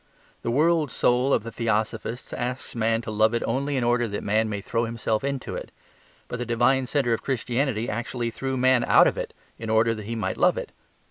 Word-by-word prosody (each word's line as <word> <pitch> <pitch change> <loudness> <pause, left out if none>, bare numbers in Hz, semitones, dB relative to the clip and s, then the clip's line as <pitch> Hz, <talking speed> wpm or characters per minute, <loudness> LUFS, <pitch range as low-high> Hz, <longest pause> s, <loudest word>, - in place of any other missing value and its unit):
The - - -3
world 155 +4 +3
soul 125 +3 +2
of - - +2
the 115 - -6
Theosophists 115 +2 -2
asks 125 +2 -3
man 115 0 +1
to 110 - -5
love 110 +2 +3
it 115 - 0
only 140 +4 -1
in 125 - 0
order 120 0 +2
that 100 -1 -4
man 110 +2 +1
may 105 -1 -3
throw 115 +4 -1
himself 115 -1 -2
into 140 -1 -3
it. - - -6 0.6
But 125 - -5
the - - -1
divine 125 +3 +2
centre 130 -4 +1
of 115 - -1
Christianity 125 -2 -1
actually 120 +1 -3
threw 135 +2 -3
man 130 -1 +4
out - - +6
of - - +2
it - - -4 0.3
in 115 -1 -5
order 110 +1 +3
that 110 -2 -7
he 115 - -3
might 110 - -2
love - - +3
it. - - -5
120 Hz, 215 wpm, -25 LUFS, 110-130 Hz, 0.6 s, out